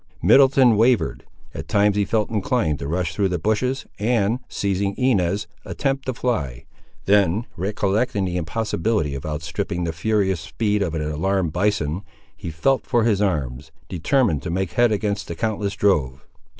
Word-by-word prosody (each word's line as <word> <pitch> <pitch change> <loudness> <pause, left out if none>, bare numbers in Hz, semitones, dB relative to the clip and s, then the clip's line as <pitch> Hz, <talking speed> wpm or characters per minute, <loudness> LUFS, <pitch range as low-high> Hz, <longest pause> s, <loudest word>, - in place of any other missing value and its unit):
Middleton 130 +2 +6
wavered. 110 - +2 0.3
At - - -7
times 105 0 +3
he 105 -1 +1
felt 110 0 0
inclined 110 - 0
to 70 - -5
rush 85 +1 -1
through 95 +3 +1
the 90 - -1
bushes, 110 - -1
and, 110 +1 +1
seizing 100 0 -1
Inez, 100 -6 +1 0.2
attempt 135 -1 -2
to 130 - 0
fly. 70 - -2 0.4
Then 100 +2 +3
recollecting 100 +3 0
the 90 -1 -3
impossibility 90 -2 -1
of 70 +2 -5
outstripping 80 +3 -3
the 80 -1 -2
furious 95 +1 0
speed 105 +6 -1
of 85 -5 -1
an 80 - -2
alarmed 80 +2 -1
bison, 90 -3 0 0.3
he - - -7
felt 105 +13 0
for 120 -3 +2
his 105 -3 +2
arms, 70 -8 -2 0.2
determined 90 - +1
to - - -5
make 95 +1 -2
head 120 -2 +3
against 105 -1 -1
the 85 - -5
countless 105 +1 -2
drove. 75 -10 +1
100 Hz, 160 wpm, -22 LUFS, 85-110 Hz, 0.4 s, Middleton